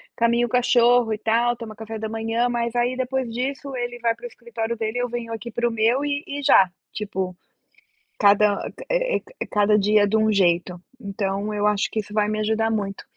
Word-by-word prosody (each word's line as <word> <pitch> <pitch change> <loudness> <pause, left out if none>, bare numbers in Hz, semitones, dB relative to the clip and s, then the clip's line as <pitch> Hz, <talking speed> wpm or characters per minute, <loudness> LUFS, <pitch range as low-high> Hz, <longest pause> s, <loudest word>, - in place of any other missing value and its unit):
caminha 235 +1 +2
o - - -6
cachorro 245 -1 +4
e 215 - -2
tal, 230 +2 +1
toma 230 -2 -9
café 220 +1 -7
da 220 0 -4
manhã. 225 +2 -1
Mas 235 -1 -2
aí 245 +1 +1
depois 260 0 -2
disso 270 +2 -4
ele 240 -1 -4
vai 230 -1 +1
para 485 - -12
o - - -2
escritório 235 - -5
dele 220 +2 -2
e - - +1
eu 245 - -2
venho 230 -1 -5
aqui 225 +1 -6
para 240 +1 0
o - - -1
meu 230 +5 +1
e 285 +1 -2
e 285 0 -5
já, 195 -9 +6 0.2
tipo, 190 -3 -4 0.8
cada, 205 0 +3 0.2
eh - - +1
eh, - - -5
c - - -9
cada 210 0 +3
dia 205 0 +3
de 220 +2 +2
um 220 0 +3
jeito, 180 -2 +1 0.2
então 200 -1 -3
eu 210 0 +1
acho 210 -1 +1
que 220 - -1
isso 210 0 -7
vai 210 -1 +2
me 215 0 -2
ajudar 220 +1 +1
muito. 200 -2 -3
225 Hz, 220 wpm, -23 LUFS, 210-245 Hz, 0.8 s, já